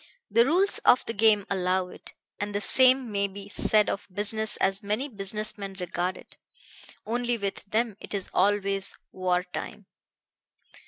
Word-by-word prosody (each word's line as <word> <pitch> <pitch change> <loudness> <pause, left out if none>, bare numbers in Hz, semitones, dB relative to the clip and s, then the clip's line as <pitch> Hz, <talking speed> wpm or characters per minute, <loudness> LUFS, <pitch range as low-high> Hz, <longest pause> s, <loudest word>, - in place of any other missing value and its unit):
The 230 +4 +4
rules 370 +7 +3
of 250 - +3
the 230 - -4
game 210 -2 +3
allow 185 -1 -1
it; - - -13 0.2
and 205 0 -4
the - - +1
same 255 0 +5
may 200 -1 0
be 200 +1 -11
said 210 +1 +3
of 195 - -4
business 215 +2 +1
as 195 +1 0
many 210 +7 -2
business 210 -2 -2
men 195 -1 -7
regard 180 +1 -3
it. - - -17 0.7
Only 240 +1 -1
with 200 -2 -5
them 215 0 -2
it - - -7
is 195 - -2
always 195 0 0
war 180 -1 -1
time." 180 - -8
205 Hz, 160 wpm, -26 LUFS, 195-225 Hz, 0.7 s, same